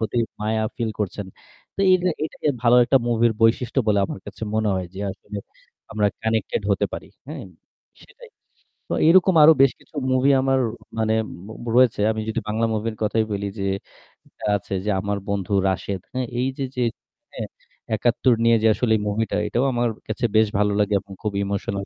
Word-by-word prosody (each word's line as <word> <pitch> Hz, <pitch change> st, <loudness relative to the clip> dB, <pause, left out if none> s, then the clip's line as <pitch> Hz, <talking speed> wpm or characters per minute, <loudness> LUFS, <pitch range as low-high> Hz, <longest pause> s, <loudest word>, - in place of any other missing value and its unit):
প্রতি 110 Hz, +2 st, -2 dB, 0.2 s
মায়া 110 Hz, +1 st, 0 dB
ফিল 115 Hz, -2 st, -1 dB
করছেন। 105 Hz, 0 st, -3 dB, 0.5 s
তো -, -, -4 dB
এইটা 185 Hz, -1 st, +4 dB
এইটাকে 155 Hz, -1 st, -2 dB
ভালো 120 Hz, 0 st, +5 dB
একটা 135 Hz, +3 st, +3 dB
মুভির 115 Hz, -1 st, +3 dB
বৈশিষ্ট্য 120 Hz, +3 st, +2 dB
বলে 105 Hz, -2 st, +3 dB
আমার -, -, -6 dB
কাছে 105 Hz, +2 st, -10 dB
মনে 110 Hz, 0 st, +1 dB
হয় 95 Hz, -1 st, -2 dB
যে, 95 Hz, -, -8 dB
আসলে 100 Hz, +2 st, -9 dB, 0.6 s
আমরা 105 Hz, -1 st, +2 dB, 0.2 s
কানেক্টেড 110 Hz, -2 st, -1 dB
হতে 100 Hz, -, +2 dB
পারি। -, -, -6 dB, 0.2 s
হ্যাঁ? -, -, -6 dB, 0.6 s
সেটাই। -, -, -16 dB, 0.6 s
সো -, -, +1 dB
এইরকম 185 Hz, +2 st, +6 dB
আরও 160 Hz, +2 st, +9 dB
বেশ 135 Hz, -, +5 dB
কিছু -, -, -25 dB, 0.2 s
মুভি 130 Hz, +2 st, +3 dB
আমার 135 Hz, 0 st, +2 dB, 0.4 s
মানে 110 Hz, 0 st, +1 dB, 0.3 s
মো 110 Hz, +2 st, -9 dB
রয়েছে। 125 Hz, -4 st, +4 dB
আমি 110 Hz, 0 st, -2 dB
যদি 110 Hz, -, -1 dB
বাংলা 115 Hz, +2 st, +1 dB
মুভির 110 Hz, +1 st, -2 dB
কথাই 110 Hz, +1 st, +1 dB
বলি 100 Hz, 0 st, -2 dB
যে 95 Hz, -, -2 dB, 0.6 s
এটা -, -, -14 dB
আছে 100 Hz, 0 st, -5 dB
যে, 105 Hz, -, 0 dB
'আমার 100 Hz, +1 st, -2 dB
বন্ধু 100 Hz, -1 st, -2 dB, 0.2 s
রাশেদ'। 95 Hz, 0 st, -3 dB
হ্যাঁ? 130 Hz, -1 st, -1 dB
এই 130 Hz, -, +1 dB
যে, 135 Hz, -, -1 dB
যে 125 Hz, -, 0 dB, 0.5 s
হ্যাঁ? -, -, -5 dB, 0.5 s
৭১ 120 Hz, +3 st, +2 dB
নিয়ে 115 Hz, 0 st, +5 dB
যে 110 Hz, -, +5 dB
আসলে 120 Hz, 0 st, 0 dB
এ -, -, -5 dB
মুভিটা, 105 Hz, 0 st, -1 dB
এটাও 120 Hz, +5 st, 0 dB
আমার 120 Hz, 0 st, +1 dB, 0.2 s
কাছে 110 Hz, +2 st, -3 dB
বেশ 110 Hz, 0 st, +6 dB
ভালো 105 Hz, 0 st, +2 dB
লাগে 105 Hz, 0 st, +1 dB
এবং 100 Hz, 0 st, -15 dB
খুব 105 Hz, -1 st, -1 dB
ইমোশনাল 100 Hz, 0 st, -3 dB
110 Hz, 185 wpm, -23 LUFS, 105-125 Hz, 0.6 s, আরও